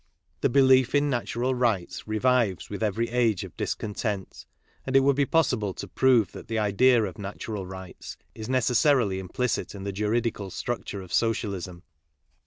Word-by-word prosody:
The - - +2
belief 130 0 +4
in 145 0 +2
natural 120 +1 -1
rights 115 -9 -1
revives 110 -3 +1
with 100 - -5
every 110 +2 0
age 115 -5 +1
of - - -10
discontent, 105 -2 -4 0.4
and 135 - -3
it 135 - +7
would 140 0 +3
be 140 -1 +1
possible 125 - +1
to - - -6
prove 125 -7 +3
that - - -10
the 115 - -2
idea 110 +3 +4
of 95 -2 -5
natural 100 0 -5
rights 95 -1 -9 0.2
is 110 0 -8
necessarily 125 -4 +2
implicit 110 +5 -2
in 95 - -7
the 100 - -3
juridical 105 0 -1
structure' 100 -2 -4
of 90 - -11
Socialism. 100 -6 -1
115 Hz, 160 wpm, -26 LUFS, 100-125 Hz, 0.4 s, it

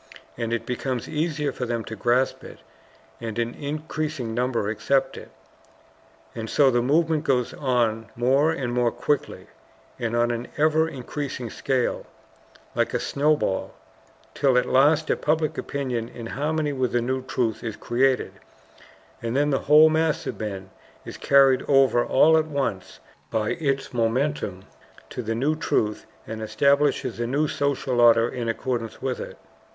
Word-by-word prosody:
And 115 -1 -3
it 115 - -2
becomes 125 -1 -3
easier 150 -2 -1
for 125 -1 -4
them 115 -1 -2
to 110 - -7
grasp 125 +3 +1
it, - - -11 0.6
and 115 -1 -5
an 120 0 -1
increasing 150 -4 -4
number 120 -3 0
accept 110 +6 0
it. - - -10 1.0
And 110 -1 -6
so 140 -2 +4
the 120 -1 +2
movement 155 +4 +2
goes 130 -5 0
on 115 -5 0
more 135 +6 +3
and 135 -7 -2
more 120 -1 +2
quickly, 135 +4 -2 0.5
and 115 -1 -2
on 120 0 +2
an 120 +1 -4
ever 155 +1 +3
increasing 130 -3 -5
scale, 130 -3 -1 0.7
like - - 0
a - - +1
snowball, 145 -9 0 0.6
till 135 -3 +2
at 125 - +3
last 150 +4 +3
a - - +3
public 155 0 0
opinion 125 -5 -3
in 115 - -9
harmony 150 +4 -1
with 130 -2 -1
the 120 - +2
new 130 +2 -1
truth 125 -3 -2
is 110 -3 -4
created, 130 +2 +1 0.9
and 115 +1 -3
then 145 +1 +2
the 135 - +1
whole 155 +1 +8
mass 160 0 +1
of - - -5
men 95 -3 -5 0.3
is - - -8
carried 135 -2 +4
over 135 -3 +4
all 160 +4 +5
at 160 - -2
once 140 -11 -3 0.3
by 110 -1 -1
its 140 -5 -2
momentum 115 -4 -1 0.5
to - - -4
the 115 -1 -3
new 140 +7 +1
truth 105 -8 -1 0.2
and 110 0 -6
establishes 140 +5 +1
a 120 - -1
new 145 +5 +1
social 135 -4 0
order 115 -1 +6
in 120 -1 -4
accordance 115 -1 -3
with 130 -2 -3
it. - - -7
130 Hz, 155 wpm, -24 LUFS, 115-145 Hz, 1.0 s, whole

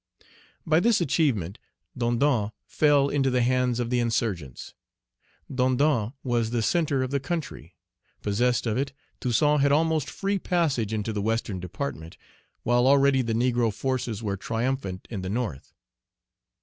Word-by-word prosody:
By 155 0 +4
this 230 +3 +3
achievement, 125 - 0 0.4
Dondon 120 -2 +1 0.2
fell 145 -2 +3
into 140 -2 +1
the 125 -1 +2
hands 125 -1 +1
of 120 0 -2
the 125 - +2
insurgents. 110 - -2 0.7
Dondon 130 -2 +1
was 120 -3 0
the 115 -1 -1
centre 145 -2 +1
of 130 - -4
the 140 - +1
country. 165 +3 -5 0.5
Possessed 120 +5 +1
of 115 0 0
it, 140 0 -2 0.3
Toussaint 145 +4 +2
had 140 0 +3
almost 160 0 +2
free 200 0 -2
passage 150 - 0
into 110 0 -2
the 105 - -2
Western 110 -2 -1
Department, 90 - -6 0.5
while 120 +2 +3
already 140 -1 +5
the 115 -2 -2
negro 120 -1 +2
forces 120 -2 -3
were 100 -2 -2
triumphant 115 -3 -3
in 100 -5 -4
the 95 - -4
north. 105 - -3
125 Hz, 145 wpm, -26 LUFS, 110-140 Hz, 0.7 s, already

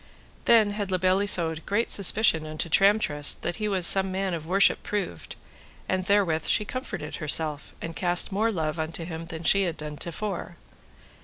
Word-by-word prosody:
Then 220 -3 +4
had 205 -1 -5
La 185 - 0
Beale 185 +1 +1
Isoud 165 -4 0
great 220 +4 -1
suspicion 195 -5 +3
unto 155 +2 -5
Tramtrist, 195 -6 +3
that 175 - -3
he 215 -1 -3
was 190 -4 +2
some 190 +1 +6
man 190 0 -3
of 160 -2 -6
worship 195 +3 +3
proved, 195 - -5 0.5
and 185 -1 -2
therewith 185 -6 0
she 210 - +1
comforted 190 - -6
herself, 150 0 -1
and 165 0 -6
cast 175 +1 +1
more 220 +4 0
love 160 -4 -3
unto 165 +1 -4
him 165 -1 -8
than 160 0 -8
she 195 +4 +3
had 170 -2 -4
done 150 -1 -8
to 170 - -7
fore. 180 -1 -6
180 Hz, 180 wpm, -25 LUFS, 160-200 Hz, 0.5 s, some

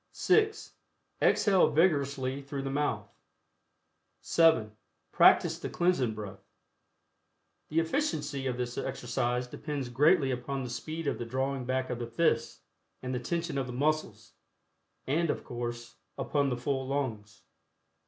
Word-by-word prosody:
(6) 430 0 +1 0.5
Exhale 195 -3 +4
vigorously 140 -4 +1
through 140 0 -5
the 135 - -3
mouth. 135 -8 -1 1.1
(7) 110 - +3 0.4
Practice - - +5
the - - -5
Cleansing 155 -11 +1
Breath. 105 -2 -8 1.3
The 155 - -3
efficiency 150 - -1
of 125 -1 -2
this 120 -1 -3
exercise 125 0 -2
depends 140 +1 -5
greatly 145 +3 +4
upon 130 +2 -3
the 125 - -5
speed 155 +7 -5
of - - -1
the 120 - -3
drawing 130 +1 -2
back 130 0 -1
of 125 - -3
the 120 - -4
fists, 115 0 0 0.4
and 130 0 -3
the 125 - -1
tension 165 +2 -2
of 130 - -2
the 125 - -6
muscles, 125 - -1 0.7
and, 160 +4 +1
of - - -2
course, 120 -1 -6 0.2
upon 140 -2 0
the 125 - -2
full 130 +1 -2
lungs. 110 -8 -3
135 Hz, 135 wpm, -30 LUFS, 120-150 Hz, 1.3 s, Practice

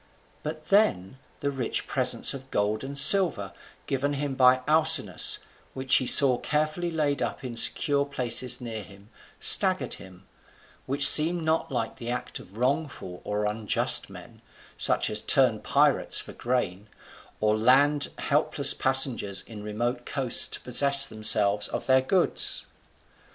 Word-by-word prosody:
But 155 0 -10
then 130 - -1 0.2
the 140 - -4
rich 130 -4 -5
presents - - +1
of 135 -1 -12
gold 105 0 -4
and 140 +1 -7
silver 140 - +4 0.3
given 140 +2 -4
him 140 -1 -6
by 130 -1 +1
Alcinous, 155 - +3 0.4
which 130 0 0
he 130 - -3
saw 130 -2 +7
carefully 155 +3 -4
laid 150 -4 -4
up - - -6
in 125 -2 -9
secure 140 +4 0
places 125 -2 +1
near 115 -3 -9
him, 100 +1 -19 0.3
staggered - - +3
him: 95 0 -15 0.6
which 140 +1 +9
seemed 165 +2 +5
not 160 -1 -3
like 115 -2 -6
the 120 -2 -9
act 125 - -7
of 100 +4 -17
wrongful 125 - -5
or 105 0 -5
unjust 105 0 -1
men, - - -16 0.3
such - - -1
as 105 0 -1
turn 125 -5 +2
pirates - - -1
for - - -10
gain, 110 -5 -5 0.5
or 105 0 -1
land 140 +6 +1
helpless 145 -1 0
passengers 130 -7 0
in 110 -2 -13
remote 120 +4 -6
coasts 130 -4 0
to - - -5
possess 140 +2 +3
themselves 105 -2 -1
of - - -8
their 130 0 +1
goods. 180 +7 -2
130 Hz, 145 wpm, -23 LUFS, 110-145 Hz, 0.6 s, which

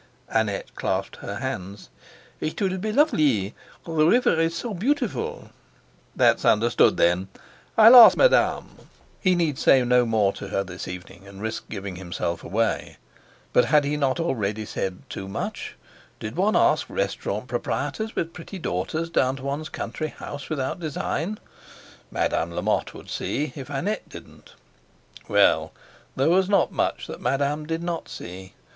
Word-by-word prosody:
Annette 110 -3 -1
clasped - - -2
her - - -6
hands. 95 +3 -5 0.5
"It 155 - -3
will 190 -2 0
be 215 +3 -2
lovelee. 150 - +2 0.3
The 165 - -7
river 240 +11 +4
is 165 0 +1
so 230 +4 -4
beautiful" 245 +5 -2 0.6
"That's - - +3
understood, 115 +2 +4
then. 90 +2 +2 0.5
I'll 225 +3 +9
ask 240 -2 +10
Madame." - - +3 0.4
He 185 -2 +3
need 160 -6 0
say 130 -2 +5
no 125 0 +3
more 105 -3 +2
to - - -8
her 100 - -1
this 90 -1 -8
evening, 90 +2 -9
and 100 0 -12
risk 110 +1 -5
giving 100 -3 -6
himself 85 -2 -4
away. 115 +2 -1 0.6
But 125 - +5
had 150 0 +4
he 145 +1 0
not 135 -1 0
already 110 -10 -1
said 95 -2 -4
too 95 - -6
much? 95 - -5 0.4
Did 110 +3 -6
one 200 +5 +2
ask - - +3
restaurant - - -3
proprietors 220 0 -3
with 165 0 -2
pretty 180 +3 -9
daughters 155 - -2
down 130 -5 +1
to 135 - -10
one's 140 +3 -3
country 155 - -4
house 145 -1 -8
without 140 0 -2
design? 165 +4 -3 0.7
Madame 85 - 0
Lamotte 90 - -1
would - - -11
see, 150 +2 -2
if 140 -2 -8
Annette 160 +10 -3
didn't. - - -13 0.7
Well! - - +3 0.4
there 135 +4 +2
was 190 +1 +3
not 200 - +3
much - - -1
that - - -8
Madame 145 +2 0
did 165 +1 -2
not 170 -1 -4
see. 95 +1 -9
140 Hz, 150 wpm, -24 LUFS, -, 0.7 s, ask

